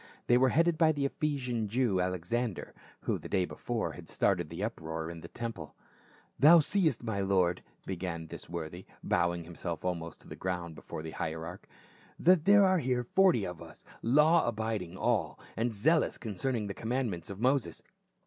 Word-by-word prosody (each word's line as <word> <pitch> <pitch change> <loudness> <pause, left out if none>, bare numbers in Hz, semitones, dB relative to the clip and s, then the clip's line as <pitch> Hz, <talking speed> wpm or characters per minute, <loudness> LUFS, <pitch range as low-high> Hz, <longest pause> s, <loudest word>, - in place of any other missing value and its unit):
They 120 - +4
were 130 0 +5
headed 165 +3 +2
by 160 -2 +5
the 140 -1 -1
Ephesian 130 -6 -1
Jew, 110 -4 +1
Alexander, 90 +5 -2 0.3
who - - -1
the - - -9
day 95 -2 +2
before - - -3
had - - -11
started 85 -5 +1
the 85 +5 -5
uproar 80 -6 -4
in 85 -1 -9
the - - -8
temple. 115 -11 -6 0.6
"Thou 165 +4 +9
seest, 160 - +1
my 110 -4 -2
lord," 95 -3 +2 0.2
began 85 -3 -4
this 80 - -10
worthy, 85 +1 -6 0.2
bowing 85 -1 +1
himself 85 +1 -6
almost 85 -2 -3
to - - -16
the - - -8
ground 90 -2 -3
before 80 0 -8
the 80 - -6
hierarch, 80 +4 -5 0.5
"that 175 -3 +4
there 200 0 +7
are 185 -1 +3
here 125 -3 0
forty 175 - +3
of 90 -2 -6
us, 80 -2 -12 0.2
law 150 +7 +4
abiding 110 -6 -2
all, - - 0 0.2
and 115 +2 0
zealous 155 +10 +2
concerning 110 +2 -2
the 100 - -4
commandments 115 -7 -2
of 100 0 -7
Moses. 125 - +1
105 Hz, 170 wpm, -31 LUFS, 85-130 Hz, 0.6 s, Thou